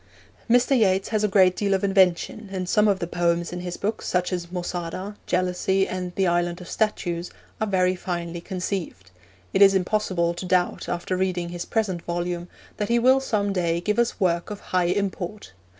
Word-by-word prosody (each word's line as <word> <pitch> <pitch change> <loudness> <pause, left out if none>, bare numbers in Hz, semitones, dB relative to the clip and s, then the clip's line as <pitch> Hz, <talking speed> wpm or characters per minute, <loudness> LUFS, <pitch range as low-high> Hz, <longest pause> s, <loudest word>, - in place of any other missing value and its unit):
Mr. 245 +3 +4
Yeats 195 -5 +2
has 215 -1 0
a - - +4
great 190 -2 +4
deal 200 -2 +1
of 190 - -2
invention, 195 +2 +2
and 185 -2 -3
some 210 +3 +3
of 200 -2 +3
the 175 - -3
poems 170 0 0
in 180 - -4
his 175 0 -5
book, 215 +2 -2
such 180 +1 -1
as 175 -1 -4
Mosada, 180 +2 -4
Jealousy, 185 +2 +1
and 180 -1 -4
The 195 - +2
Island 175 0 +1
of 180 - -10
Statues, 175 -5 -1 0.3
are 220 - +1
very 185 -2 +2
finely 175 -1 -4
conceived. 180 - -4 0.4
It 195 - +2
is 195 -1 +8
impossible 180 -3 +1
to 175 +2 -6
doubt, 180 -1 +1
after 175 +1 -2
reading 180 -2 -1
his 175 0 -5
present 200 -6 -1
volume, 175 0 -3 0.3
that 210 - -2
he 235 - +3
will 260 +3 +5
some 205 -6 0
day 170 -2 0
give 210 +6 0
us 235 -1 +1
work 170 -3 +1
of 205 -1 -6
high 180 -1 +3
import. 195 - -2
185 Hz, 190 wpm, -24 LUFS, 175-200 Hz, 0.4 s, is